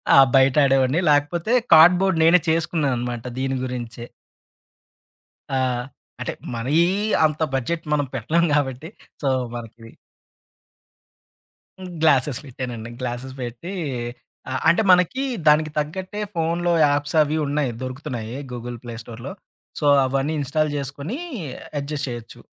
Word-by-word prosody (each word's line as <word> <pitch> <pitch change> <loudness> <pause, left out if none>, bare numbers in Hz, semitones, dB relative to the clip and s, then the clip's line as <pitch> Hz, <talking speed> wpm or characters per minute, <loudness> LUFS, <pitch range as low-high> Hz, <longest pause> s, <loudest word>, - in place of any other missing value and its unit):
ఆ! - - +7 0.2
బయటాడేవాన్ని. 135 +1 +4
లాకపోతే 160 +7 +1 0.2
కార్డ్‌బోర్డ్ 175 +2 +6
నేనే 170 +3 +6
చేసుకున్నా 160 -2 +1
అనమాట 120 -1 -4 0.2
దీని 135 0 -1
గురించే. 120 -2 -6 1.5
ఆ! - - +2 0.6
అంటే - - -3 0.2
మరీ 120 +5 -2 0.5
అంత 155 0 -1
బడ్జెట్ 160 +6 -1
మనం 145 -1 +1
పెట్టలేం 170 +2 +1
గాబట్టి 145 +1 -1 0.3
సో, 145 - -1 0.3
మనకి 115 -1 -9 2.0
హ్మ్. 185 -1 -8
గ్లాసెస్ 140 -4 +3
పెట్టానండి. 125 -4 -6
గ్లాసెస్ 125 +1 -5
పెట్టి 125 +10 -6 0.8
అ - - -3 0.2
అంటే, 170 - +4
మనకి 180 +9 +3 0.2
దానికి 155 +1 +4
తగ్గట్టే 185 +7 -3
ఫోనులో 170 +1 0
యాప్స్ 145 +2 0
అవీ 150 +1 +1
ఉన్నాయి. 140 -2 0
దొరుకుతున్నాయి 125 -3 -5 0.2
గూగుల్ 120 0 -6
ప్లే 120 -1 -7
స్టోర్‌లో. 120 +3 -8 0.5
సో, 150 - -2 0.2
అవన్నీ 135 +3 -1
ఇన్‌స్టాల్ 150 +2 0
జేసుకొని 145 - -4 0.6
అడ్జస్ట్ 145 0 -4
జెయొచ్చు. 120 -2 -8
145 Hz, 115 wpm, -22 LUFS, 125-160 Hz, 2.0 s, ఆ